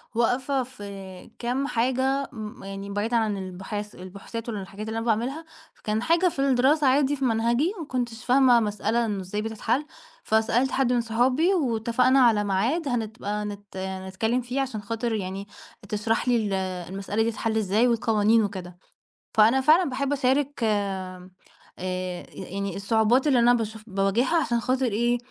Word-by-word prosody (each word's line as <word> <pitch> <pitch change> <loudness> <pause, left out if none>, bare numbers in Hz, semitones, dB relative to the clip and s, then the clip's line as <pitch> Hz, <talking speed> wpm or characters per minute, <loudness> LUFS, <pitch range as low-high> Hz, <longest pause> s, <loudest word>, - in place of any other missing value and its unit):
واقفة 255 +3 +1
في 200 -6 -10
كام 250 +3 -1
حاجة، 260 +3 0
م 215 -3 -8
يعني 195 0 -7
بعيدًا 210 +4 0
عن 215 -3 0
البحاث 195 +3 -6
البحوثات 200 +5 -8
والحاجات 205 0 -6
اللي 220 - -3
أنا 225 - -3
باعملها، 245 +8 -1 0.3
فكان 215 +1 -2
حاجة 335 +7 +3
في 300 - -9
الدراسة 275 +2 +3
عادي 275 +2 +3
في 270 -1 -2
منهجي 235 - +1
ما 325 - -5
كنتش 245 -4 -4
فاهمة 255 -1 +5
مسألة 215 +2 0
إنه 205 -3 -2
إزاي 190 +3 -4
بتتحل، 225 +5 -1 0.4
فسألت 225 +4 +2
حد 255 -2 +2
من 240 - +2
صحابي 250 - +2
واتفقنا 250 - +2
على 225 -5 +5
معاد 235 - 0
هنبقى 215 -3 -2
نت 205 -1 -8
نتكلم 190 +5 -2
فيه 250 +3 -2
عشان 250 -6 -3
خاطر 230 +2 -2
يعني 195 -1 -4 0.4
تشرح 220 +3 -1
لي 245 - +4
ال 210 -3 -1 0.4
المسألة 195 +3 -1
دي 230 - 0
تتحل 220 +1 -2
إزاي 215 +3 +2
والقوانين 225 -1 +3
وكده، 185 -3 -5 0.6
فأنا 225 +5 +5
فعلًا 315 +5 +5
باحب 275 +2 -1
أشارك 275 +1 +1
آمم 190 -4 -2 0.5
آآ 185 -1 -4
يعني 200 0 -5
الصعوبات 220 +6 +2
اللي 265 -4 +4
أنا 240 +1 +5
باشوف 220 -2 -3
باواجهها 205 - +1
عشان 235 -4 0
خاطر 260 +2 0
إيه، 240 +2 +1
225 Hz, 155 wpm, -25 LUFS, 205-255 Hz, 0.6 s, فاهمة